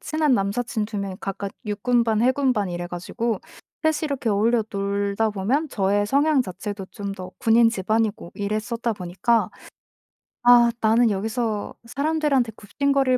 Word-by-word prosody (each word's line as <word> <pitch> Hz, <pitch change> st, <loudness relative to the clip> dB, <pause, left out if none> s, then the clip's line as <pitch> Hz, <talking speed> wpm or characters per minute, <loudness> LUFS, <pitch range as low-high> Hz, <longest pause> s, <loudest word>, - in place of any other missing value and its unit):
친한 310 Hz, -2 st, +1 dB
남사친 215 Hz, +2 st, -1 dB
2 215 Hz, 0 st, -6 dB
명이 195 Hz, -2 st, -3 dB
각각 195 Hz, 0 st, -4 dB
육군반, 225 Hz, +1 st, +1 dB
해군반 255 Hz, -5 st, +2 dB
이래 175 Hz, 0 st, -4 dB
가지고 190 Hz, +5 st, -3 dB, 0.4 s
3 315 Hz, 0 st, +1 dB
이 310 Hz, -, +1 dB
이렇게 265 Hz, -5 st, -1 dB
어울려 225 Hz, +3 st, +2 dB
놀다 200 Hz, +2 st, 0 dB
보면 240 Hz, +10 st, 0 dB
저의 205 Hz, -1 st, +1 dB
성향 285 Hz, +3 st, +3 dB
자체도 200 Hz, -1 st, -5 dB
좀 200 Hz, -1 st, -5 dB
더 185 Hz, -2 st, -8 dB
군인 230 Hz, 0 st, +5 dB
집안이고 215 Hz, -2 st, -1 dB
이랬었다 215 Hz, +3 st, -2 dB
보니까 200 Hz, +5 st, 0 dB, 0.9 s
'아 240 Hz, -1 st, +7 dB
나는 225 Hz, +1 st, +4 dB
여기서 215 Hz, +1 st, -2 dB
사람들한테 280 Hz, -2 st, 0 dB
굽신거릴 270 Hz, +4 st, +1 dB
225 Hz, 310 characters per minute, -23 LUFS, 200-245 Hz, 0.9 s, 아